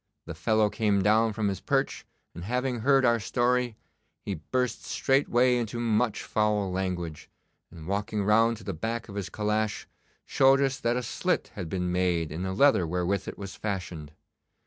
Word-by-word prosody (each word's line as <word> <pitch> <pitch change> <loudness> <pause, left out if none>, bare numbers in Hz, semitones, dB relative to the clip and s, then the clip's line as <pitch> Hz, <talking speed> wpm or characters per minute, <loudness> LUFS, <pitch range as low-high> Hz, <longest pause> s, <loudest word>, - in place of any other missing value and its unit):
The - - -6
fellow 110 -1 +1
came 105 -3 +1
down 110 +2 +3
from 110 -1 -1
his 95 -2 -2
perch, - - -1 0.3
and 85 - -8
having 125 +3 -1
heard 135 +2 +4
our 120 -1 +3
story, 125 +1 0 0.5
he 100 - -3
burst 125 +10 -2
straightway 130 -2 +2
into 120 0 -3
much 115 -1 0
foul 105 -3 0
language, 90 -4 -4 0.4
and 80 -2 -11
walking 105 +1 -1
round 115 +3 +3
to - - -13
the - - -4
back 110 +8 -4
of 100 - -9
his 100 -3 -4
calash, 105 +2 -1 0.4
showed 135 0 +4
us 135 -1 0
that 120 -1 0
a 125 - -2
slit - - -1
had 85 - -6
been 90 -1 -2
made 90 -3 0
in 80 +3 -5
the 95 0 -2
leather 100 -6 +4
wherewith 90 +3 -1
it - - -6
was 100 -1 -7
fashioned. 90 -7 -5
105 Hz, 175 wpm, -27 LUFS, 95-120 Hz, 0.5 s, heard